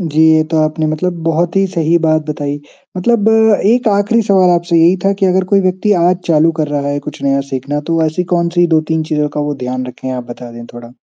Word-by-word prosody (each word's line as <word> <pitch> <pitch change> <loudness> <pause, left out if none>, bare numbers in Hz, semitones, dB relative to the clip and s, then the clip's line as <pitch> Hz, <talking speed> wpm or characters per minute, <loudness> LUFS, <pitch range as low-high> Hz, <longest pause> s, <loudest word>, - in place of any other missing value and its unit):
जी, 160 -3 -1 0.2
ये 155 - +3
तो 165 - 0
आपने 155 0 -2
मतलब 170 +3 -2
बहुत 165 +2 -1
ही 195 0 +3
सही 170 -3 0
बात 155 -1 +2
बताई। 145 -1 -4 0.4
मतलब 220 +3 +1
अ, 220 -2 +3
एक 245 -1 +1
आखिरी 205 +3 +1
सवाल 190 -2 +4
आपसे 170 0 +1
यही 170 +3 +4
था 195 - +3
कि 195 - +3
अगर 185 0 +1
कोई 195 - +5
व्यक्ति 185 +3 0
आज 180 +1 +3
चालू 165 0 +3
कर 150 - -1
रहा 145 -1 -2
है 145 0 -2
कुछ - - -9
नया 140 0 +1
सीखना। 135 +3 -3
तो 165 - -1
वो 165 - +1
ऐसी 170 +4 -2
कौन-सी 170 0 +1
2-3 160 +1 -1
चीज़ों 150 -1 0
का - - 0
वो - - -2
ध्यान 130 0 -4
रखें? 130 +1 -7
आप 125 -1 -5
बता 120 0 -9
दें 120 0 -10
थोड़ा। 120 0 -11
165 Hz, 240 wpm, -14 LUFS, 150-185 Hz, 0.4 s, कोई